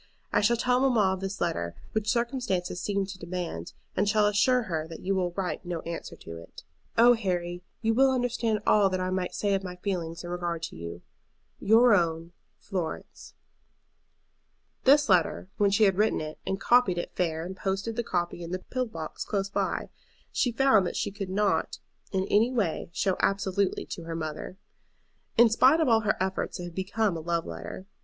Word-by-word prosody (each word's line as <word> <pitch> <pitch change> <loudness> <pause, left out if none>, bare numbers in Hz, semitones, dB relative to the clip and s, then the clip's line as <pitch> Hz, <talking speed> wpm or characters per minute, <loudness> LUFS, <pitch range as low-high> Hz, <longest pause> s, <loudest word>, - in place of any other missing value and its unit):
I - - +4
shall 235 +3 +3
tell 250 +2 +2
mamma 230 -8 +3
of 190 - -4
this 195 +1 -4
letter, 85 - -2 0.2
which 215 -1 -1
circumstances 235 -8 -1
seem 200 -1 0
to 190 -1 -9
demand, 170 - -5 0.2
and 205 - +2
shall 210 0 +3
assure 210 +5 +3
her 160 -6 -3
that 165 - -9
you 195 - 0
will 185 -2 +1
write 185 -1 -3
no 175 -2 -4
answer 170 0 -6
to 85 0 -9
it. 85 - -12 0.3
"Oh, 240 +2 +8
Harry, 175 -5 -2 0.2
you 225 0 +3
will 265 +3 +5
understand 240 -4 0
all 205 -2 +5
that 185 0 -1
I 185 0 -1
might 185 -1 -2
say 205 -1 0
of 195 0 0
my 180 -1 -6
feelings 180 -3 -3
in 175 - -6
regard 175 -2 -3
to - - -5
you. 85 +1 -7 0.6
"Your 225 +3 +5
own, 165 -3 +1 0.3
FLORENCE." 180 -5 -6 1.5
This 285 +2 +6
letter, 185 -1 +2
when 205 -1 +4
she 200 +2 +3
had 195 -3 +4
written 215 +1 +3
it 155 0 -6
and 190 - -1
copied 240 -7 +4
it 175 - -4
fair 165 -2 -1
and 190 +2 -6
posted 195 +4 -2
the 235 - 0
copy 175 -3 -2
in 170 - -6
the 185 - -2
pillar 255 +7 -3
box 160 -7 -6
close 195 -2 -2
by, - - -2 0.4
she 245 - +1
found 230 -6 +4
that - - -5
she 205 - -1
could 195 -1 -5
not 205 +2 0 0.3
in 190 -1 0
any 225 +4 +3
way 205 -12 -1
show 185 +2 0
absolutely 195 0 0
to 170 - -7
her 165 0 -4
mother. 155 +3 -5 0.8
In 235 +1 +8
spite 260 +7 +5
of 320 - +2
all 225 -2 +5
her 215 -1 0
efforts 190 0 -2
it - - -5
had 175 -1 -7
become 195 +2 0
a - - -3
love 170 0 -1
letter. 85 - -7
190 Hz, 195 wpm, -28 LUFS, 175-220 Hz, 1.5 s, Oh